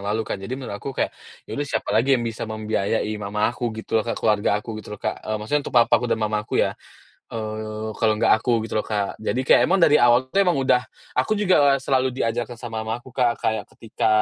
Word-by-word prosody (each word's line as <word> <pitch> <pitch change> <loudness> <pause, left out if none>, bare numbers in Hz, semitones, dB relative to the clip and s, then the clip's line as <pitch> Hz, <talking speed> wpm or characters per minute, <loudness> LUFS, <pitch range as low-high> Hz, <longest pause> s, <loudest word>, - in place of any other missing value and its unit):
lalu 110 +1 0
kan. 95 - -4
Jadi 120 +7 -5
menurut 130 -5 -7
aku 135 -1 -6
kayak, - - 0 0.3
ya - - -10
udah 145 0 -2
siapa 110 -4 -2
lagi 130 +5 +4
yang 120 - -3
bisa 115 -1 -4
membiayai 110 0 -1
mama 105 +3 0
aku 120 +1 -2
gitu 110 0 0
loh - - -5
Kak, - - -1
keluarga 105 -1 +2
aku 110 -2 -6
gitu 105 0 -8
loh - - -27
Kak, - - -2
eee, 110 - -3
maksudnya 110 +8 -1
untuk - - -14
papa 120 - +5
aku 125 - -2
dan 115 -1 +1
Mama 105 0 0
aku 105 - -4
ya, - - +2 0.6
eee, 110 0 -4
kalau 110 -1 +3
enggak 105 - +3
aku 125 - -1
gitu 110 -1 -2
loh, - - -4
Kak. 105 -2 -2
Jadi 115 +3 -1
kayak 125 - +5
emang 190 +2 +3
dari 150 -1 +6
awal 120 +2 +4
tuh 195 - +2
emang 180 -4 +3
udah 125 -3 +2 0.3
aku 175 +12 +1
juga 180 -9 +4
selalu 130 -1 +1
diajarkan 120 0 -2
sama 115 -2 -6
mamaku 120 +3 -5
Kak 120 -2 0
kayak 110 0 -1
ketika, 110 -1 -2
115 Hz, 235 wpm, -23 LUFS, 110-130 Hz, 0.6 s, dari